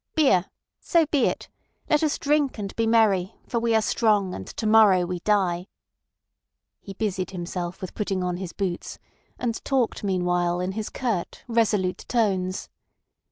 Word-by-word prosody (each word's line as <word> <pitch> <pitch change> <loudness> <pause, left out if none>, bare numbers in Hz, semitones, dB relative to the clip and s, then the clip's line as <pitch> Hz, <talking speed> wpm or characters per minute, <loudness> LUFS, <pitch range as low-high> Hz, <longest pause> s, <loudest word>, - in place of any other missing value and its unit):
"Beer! 265 - +4 0.3
So 335 -2 +3
be 290 -3 +2
it! - - -3 0.4
Let 300 - +3
us 310 -2 +1
drink 290 -3 +1
and 200 -2 -5
be 225 0 +1
merry, 215 -4 +3
for 235 - -1
we 230 -1 +1
are 220 - +3
strong, 210 -5 +2
and 95 - -7
to 220 - -5
morrow 215 -4 +6
we 180 0 -4
die." 185 -2 +1 1.1
He 195 - -9
busied 190 -3 -2
himself 175 0 -5
with 185 - -6
putting 195 -3 -2
on 180 -1 -1
his 185 -2 -5
boots, 185 -2 -4 0.4
and 230 -2 -3
talked 260 -6 0
meanwhile 180 -2 0
in 180 +1 -1
his 215 +2 -4
curt, 225 -9 -3
resolute 210 -6 +1
tones. 190 -6 0
200 Hz, 160 wpm, -25 LUFS, 180-230 Hz, 1.1 s, morrow